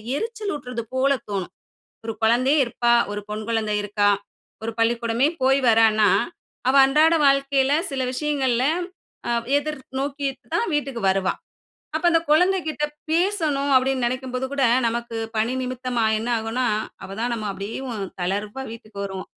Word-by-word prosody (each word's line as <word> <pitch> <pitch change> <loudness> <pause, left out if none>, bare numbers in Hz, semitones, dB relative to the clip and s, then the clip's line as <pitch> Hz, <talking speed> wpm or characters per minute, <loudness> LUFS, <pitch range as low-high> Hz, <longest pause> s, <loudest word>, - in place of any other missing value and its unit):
எரிச்சல் 435 +2 -3
ஊட்றது 250 -4 -5
போல 270 +2 +3 0.2
தோணும். 195 -3 -3 0.5
ஒரு 225 - -3
குழந்தையே 255 +6 +3
இருப்பா, 235 0 +1 0.2
ஒரு 205 - -3
பெண் 215 +1 -4
குழந்தை 220 -2 0
இருக்கா, 205 0 +1 0.5
ஒரு 225 0 -3
பள்ளிக்கூடமே 235 +3 +2
போய் 270 +1 +4
வரான்னா. 220 -2 +5 0.6
அவ 265 - +3
அன்றாட 310 +4 +4
வாழ்க்கையில 275 0 +3 0.2
சில 265 -1 -2
விஷயங்கள்ல 265 -4 0 0.6
அ - - 0 0.3
எதிர் 300 0 -4 0.2
நோக்கி 280 0 -2 0.3
தான் 470 - +1
வீட்டுக்கு 275 -5 -2
வருவா. 190 -1 +1 0.6
அப்ப 320 - -5
அந்த 330 -1 +4
குழந்தைகிட்ட 315 -3 +2 0.3
பேசணும் 320 -6 +1
அப்டின்னு 260 -1 +2
நினைக்கும்போது 255 +1 -3
கூட 275 -2 +1 0.2
நமக்கு 235 0 -4 0.2
பணி 225 +4 +1
நிமித்தமா 250 -2 -2
என்ன 230 +2 -4
ஆகும்னா, 230 +3 -1 0.4
அவ - - -8
தான் 240 0 0
நம்ம 215 -2 -4
அப்டியேவு 225 +6 -5 0.3
தளர்வா 205 +7 -2
வீட்டுக்கு 215 -3 -11
வருவோம் 190 -1 -6
255 Hz, 140 wpm, -23 LUFS, 225-280 Hz, 0.6 s, வரான்னா